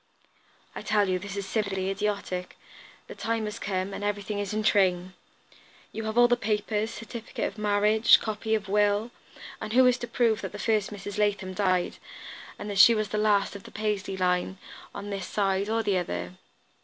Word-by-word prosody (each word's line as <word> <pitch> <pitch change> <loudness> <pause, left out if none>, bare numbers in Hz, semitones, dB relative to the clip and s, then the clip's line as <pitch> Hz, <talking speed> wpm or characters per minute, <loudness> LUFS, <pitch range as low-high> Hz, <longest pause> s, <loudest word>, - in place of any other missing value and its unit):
"I - - -6
tell 210 -2 +2
you 185 -1 0
this 200 +1 -7
is 200 - -3
simply 195 -2 -1
idiotic; 195 -3 -3 0.5
the - - -9
time 225 -1 -2
has 210 +1 -5
come, 190 0 -2
and 205 - -5
everything 205 0 -2
is 205 -2 -3
in 215 0 -1
train. 185 -3 +2 0.8
You 225 0 -5
have 220 +1 -3
all 240 0 +7
the 245 - +3
papers, 215 -1 -1
certificate 230 0 -6
of - - -5
marriage, 210 +1 +5
copy 220 0 -1
of 210 -2 -3
will, 205 +3 +2 0.5
and 215 - -4
who 255 +1 +6
is 250 0 +4
to 240 - -5
prove 230 -2 +1
that - - -6
the - - -6
first 215 -2 +1
Mrs. 205 0 -6
Latham 200 -2 0
died, 185 -2 0 0.6
and - - -7
that 200 -2 -2
she 230 +3 +9
was 215 -2 -1
the 210 - -1
last 205 -2 +2
of 200 - -7
the - - -12
Paisley 210 -3 -2
line, 180 +1 0 0.3
on 200 0 -7
this 195 -2 -4
side, 195 0 0
or 225 0 +1
the 195 -3 +1
other? 90 - -4
205 Hz, 190 wpm, -27 LUFS, 195-215 Hz, 0.8 s, she